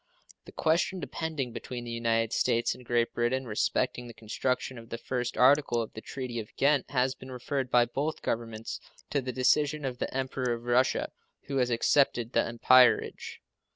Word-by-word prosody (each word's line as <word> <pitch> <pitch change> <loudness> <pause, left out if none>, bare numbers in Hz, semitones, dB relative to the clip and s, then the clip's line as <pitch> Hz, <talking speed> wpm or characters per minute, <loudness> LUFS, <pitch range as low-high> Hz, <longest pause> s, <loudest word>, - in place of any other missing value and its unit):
The - - -12
question 170 +4 +1
depending 155 -9 -4
between 125 -1 -6
the 120 - -6
United 115 -1 0
States 115 0 +1
and 125 - -13
Great 120 -1 0
Britain 125 +3 0
respecting 125 +2 -1
the 120 - -11
construction 125 +3 -2
of 115 0 -14
the 115 - -4
first 125 0 -3
article 135 -2 +4
of 115 - -4
the 110 - -8
treaty 125 -2 -5
of 105 - -9
Ghent 140 -1 +2
has 130 -1 +1
been 130 0 -12
referred 130 +1 -3
by 120 -1 +5
both 145 +6 -3
Governments 115 -1 -3 0.3
to 140 - +1
the 130 0 -4
decision 145 +3 +2
of 125 -2 -4
the - - -2
Emperor 130 -2 -1
of 115 - -10
Russia, 125 +2 +1 0.3
who 140 - -3
has 125 -1 +2
accepted 120 0 +2
the - - +3
umpirage. 125 +2 +3
125 Hz, 180 wpm, -29 LUFS, 115-135 Hz, 0.3 s, by